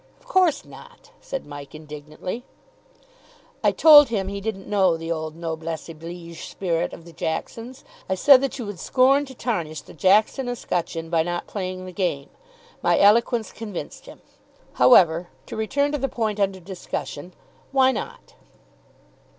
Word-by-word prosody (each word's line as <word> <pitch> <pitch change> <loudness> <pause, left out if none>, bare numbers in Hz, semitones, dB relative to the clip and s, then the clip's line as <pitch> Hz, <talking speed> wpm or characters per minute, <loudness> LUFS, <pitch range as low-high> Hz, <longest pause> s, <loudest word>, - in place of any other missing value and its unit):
"Of - - -27
course 370 - +2
not," - - -15
said 270 - -5
Mike 145 0 -10
indignantly. 155 +8 -7 1.2
"I - - +4
told 295 -4 +8
him 195 -4 -2
he 200 0 -5
didn't 195 -2 -4
know 190 -5 +2
the 165 +1 -5
old 160 -1 -4
noblesse 165 -1 -5
oblige 165 +1 -9
spirit 170 -3 -2
of 170 - -11
the 170 - -13
Jacksons. 230 - -5 0.3
I 190 - +1
said 260 +7 +7
that 275 -1 -2
you 240 - -5
would 205 -4 -7
scorn 275 - +3
to 265 - -11
tarnish 170 - -3
the - - -15
Jackson 210 - +2
escutcheon 170 -8 -3
by 165 -1 +3
not 175 +1 -3
playing 185 -2 -5
the 185 - -8
game. 175 -7 -2 0.5
My - - +3
eloquence 225 +2 +3
convinced 210 -5 -8
him. - - -13 0.5
However, 175 -7 +5 0.2
to - - -8
return 280 +7 0
to 295 - -2
the 270 +1 -1
point 215 -3 -2
under 195 -1 0
discussion, 175 -2 -7 0.4
why 265 -1 +4
not?" 475 - -7
190 Hz, 155 wpm, -23 LUFS, 165-245 Hz, 1.2 s, told